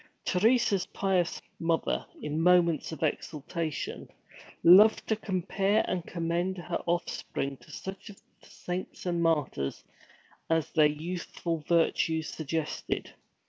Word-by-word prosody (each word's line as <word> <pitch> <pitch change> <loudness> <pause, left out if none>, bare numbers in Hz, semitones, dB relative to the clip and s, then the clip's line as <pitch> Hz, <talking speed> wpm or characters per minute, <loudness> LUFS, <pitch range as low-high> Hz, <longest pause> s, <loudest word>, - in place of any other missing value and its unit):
Teresa's 210 0 +3
pious 185 -3 0 0.2
mother, 165 0 0 0.2
in 150 +1 -1
moments 170 -3 +4
of 160 - -5
exultation, 155 +1 -3 0.5
loved 200 +6 +8
to 220 - +1
compare 195 +1 0
and 180 -2 -1
commend 170 +2 -1
her 175 0 -3
offspring 170 -5 -2
to - - -20
such 190 +3 -7
of 200 - -12 0.2
the - - -18
saints 180 +1 -6
and 175 -1 0
martyrs 150 - 0 0.7
as 165 -2 +1
their 155 -2 +5
youthful 165 +2 -4
virtues 165 -1 +2
suggested. 160 0 -3
170 Hz, 115 wpm, -29 LUFS, 160-185 Hz, 0.7 s, loved